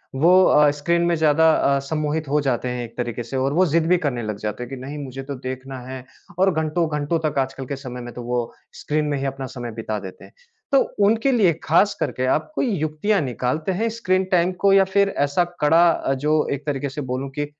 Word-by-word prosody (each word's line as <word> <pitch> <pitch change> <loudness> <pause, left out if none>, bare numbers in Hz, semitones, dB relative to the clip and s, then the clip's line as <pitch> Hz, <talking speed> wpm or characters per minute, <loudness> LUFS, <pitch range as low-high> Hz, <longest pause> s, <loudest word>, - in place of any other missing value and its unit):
वो 180 +7 +5
अ, 150 0 +5
स्क्रीन 170 +4 0
में 170 - +2
ज़्यादा 160 0 +4
अ, 140 -2 +2
सम्मोहित 155 0 -1
हो 150 +1 +2
जाते 125 -3 -1
हैं 125 0 -3
एक - - -15
तरीके 120 -1 -3
से 130 +4 -5
और 135 +2 0
वो 185 +4 +4
ज़िद 165 0 +1
भी 180 - +4
करने 120 -5 -1
लग 105 -1 -4
जाते 105 +3 -4
हैं 120 - -9
कि 135 - -5
नहीं 145 +2 -6
मुझे 135 0 -7
तो 140 0 -6
देखना 130 0 -5
है 130 -1 -7 0.4
और 190 +1 +4
घंटो 160 +2 0
घंटो 150 +3 0
तक 140 -2 -1
आजकल 135 0 -3
के 140 - -4
समय 130 -2 -8
में 120 0 -8
तो 120 - -7
वो 120 -1 -2 0.3
स्क्रीन 150 0 -1
में 145 -1 -1
ही 135 - -3
अपना 135 0 -4
समय 120 -1 -5
बिता 110 -1 -4
देते 95 -1 -10
हैं। - - -19 0.4
तो 275 - +6 0.3
उनके 225 +6 +2
लिए 205 -9 +4
खासकर 190 +7 +2
के 130 - -2
आप 155 - -10
कोई 265 - 0
युक्तियाँ 155 +7 0
निकालते 130 +5 -2
हैं 220 +5 0
स्क्रीन 185 -2 +2
टाइम 180 0 +3
को 200 - +5
या 195 - +6
फिर 200 +1 +2 0.2
ऐसा 145 +5 +1 0.2
कड़ा 165 +4 +5
अ, 135 - -1
जो 150 +3 +1
एक 140 +1 -6
तरीके 140 -1 -2
से 135 +3 -6
बोलूँ 135 +2 -3
कि 145 - 0
145 Hz, 235 wpm, -22 LUFS, 130-170 Hz, 0.4 s, तो